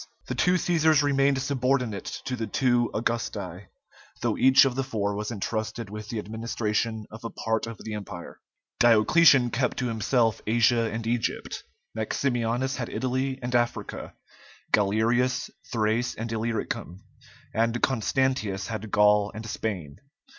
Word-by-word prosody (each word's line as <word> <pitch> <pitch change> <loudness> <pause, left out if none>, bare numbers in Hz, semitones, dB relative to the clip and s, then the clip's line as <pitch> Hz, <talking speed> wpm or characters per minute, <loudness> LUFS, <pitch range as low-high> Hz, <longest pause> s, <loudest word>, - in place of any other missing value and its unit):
The - - -3
two 180 - +2
Cæsars 160 -4 +3
remained 140 -1 +2
subordinate 125 -6 0 0.2
to 130 - -2
the 115 -2 -3
two 120 +1 +2
Augusti, 105 -5 -3 0.5
though - - +1
each 130 +1 +6
of 135 - +1
the 135 +2 -1
four 105 -6 -2
was 105 +1 -3
entrusted 110 0 -3
with 105 0 -7
the 115 - -3
administration 110 0 -2
of 110 +2 -10
a 115 - -3
part 110 0 -2
of 115 -2 -7
the 110 - -5
Empire. 100 -4 -7 0.4
Diocletian 120 +3 +6
kept 125 +1 0
to 125 -2 -1
himself 115 +1 +1
Asia 115 0 +3
and 110 +1 -4
Egypt; 115 0 -2 0.3
Maximianus 120 +2 -1
had 120 -2 -4
Italy 130 +1 -1
and 125 0 -3
Africa; 120 -1 -1 0.6
Galerius, 115 +5 +2 0.2
Thrace 115 +1 0
and 115 +1 -5
Illyricum; 110 -4 -3 0.5
and 115 +1 +1
Constantius 115 -5 0
had 110 -1 -5
Gaul 105 0 +4
and 110 +1 -6
Spain. 95 -10 -4
115 Hz, 140 wpm, -26 LUFS, 110-125 Hz, 0.6 s, each